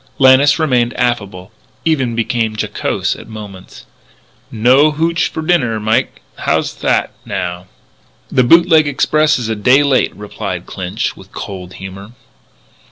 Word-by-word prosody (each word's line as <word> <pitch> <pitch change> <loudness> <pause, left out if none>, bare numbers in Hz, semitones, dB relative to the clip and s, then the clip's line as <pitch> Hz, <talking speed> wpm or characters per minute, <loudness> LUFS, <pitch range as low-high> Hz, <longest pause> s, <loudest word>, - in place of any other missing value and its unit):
Lannis 135 +2 +5
remained 125 -7 +1
affable, 100 -6 -2 0.3
even 135 -8 0
became 115 -1 -1
jocose - - -2
at - - -12
moments: 105 -4 -11 0.6
"No 130 +5 +4
hootch 165 +2 0
for 160 - -6
dinner, 140 -10 +1
Mike? 110 +4 -1
How's - - -1
that, - - 0
now?" 90 +1 -4 0.6
"The 125 - +3
Boot 170 +8 +5
leg 160 -3 +4
Express 155 +2 +2
is 120 -3 -4
a 110 - -1
day 125 +7 +4
late," 135 -3 +2
replied 105 0 -6
Clinch, 90 -1 -4
with - - -16
cold 90 -2 -8
humour. 95 +4 -10
120 Hz, 135 wpm, -16 LUFS, 105-145 Hz, 0.6 s, Lannis